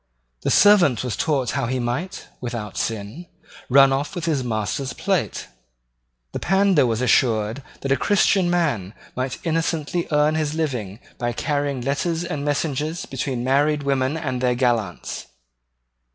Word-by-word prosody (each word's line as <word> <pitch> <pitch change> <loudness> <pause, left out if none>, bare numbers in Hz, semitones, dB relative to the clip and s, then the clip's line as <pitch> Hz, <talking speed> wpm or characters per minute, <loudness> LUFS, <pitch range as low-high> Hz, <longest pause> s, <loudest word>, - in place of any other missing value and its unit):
The - - -1
servant 185 - +5
was 125 -6 -2
taught 135 -1 0
how 135 -2 -1
he 130 +2 -1
might, 125 +10 -3
without 115 -4 -5
sin, 110 - -4 0.4
run 135 +1 +6
off 140 +6 -2
with 175 -2 -3
his 150 -6 0
master's 120 +3 -2
plate. 190 -4 -1 0.8
The - - -4
pandar 190 -7 +3
was 115 0 -1
assured 115 -1 +2 0.2
that 135 - -2
a - - +5
Christian 195 -2 +3
man 140 - 0 0.2
might 130 0 -2
innocently 165 0 -1
earn 150 +1 +3
his 155 -1 -1
living 125 -11 -2 0.2
by 120 0 -1
carrying 145 0 -1
letters 160 +6 -1
and 155 -5 -4
messages 150 +2 -1
between 130 -2 -3
married 145 +3 +2
women 135 +1 0
and 130 -6 -3
their 125 -1 +2
gallants. 120 -8 -1
140 Hz, 145 wpm, -22 LUFS, 125-160 Hz, 0.8 s, run